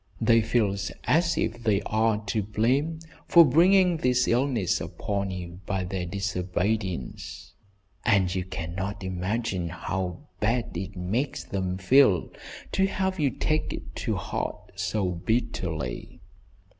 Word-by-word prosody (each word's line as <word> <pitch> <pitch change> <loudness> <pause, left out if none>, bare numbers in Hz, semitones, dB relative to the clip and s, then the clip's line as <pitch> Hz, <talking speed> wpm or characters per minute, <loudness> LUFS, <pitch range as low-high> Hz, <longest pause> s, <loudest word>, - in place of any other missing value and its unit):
They 115 0 +5
feel 110 -3 +1 0.3
as 170 +2 +2
if 120 +2 -1
they 105 -4 +2
are 110 -1 +1
to 105 +2 0
blame 130 +10 0 0.3
for 170 -1 +8
bringing 180 +4 +5
this 125 -3 +2
illness 120 -6 +1
upon 100 -1 -3
you 90 -1 -6
by 95 -1 -1
their 90 -1 -3
disobedience, 95 - -3 0.5
and 100 -5 +3
you 95 -1 -1
cannot 95 +3 -5
imagine 95 0 -2
how 90 - -3 0.2
bad 115 +1 0
it 95 +2 -5
makes 110 +10 -2
them 95 -2 -2
feel 100 -1 +4 0.4
to 195 0 +2
have 190 -1 -1
you 145 -3 +3
take 155 +4 -1
it - - -8
to - - -1
heart - - -4
so 105 -3 -1
bitterly." 85 - -2
105 Hz, 130 wpm, -27 LUFS, 90-125 Hz, 0.5 s, for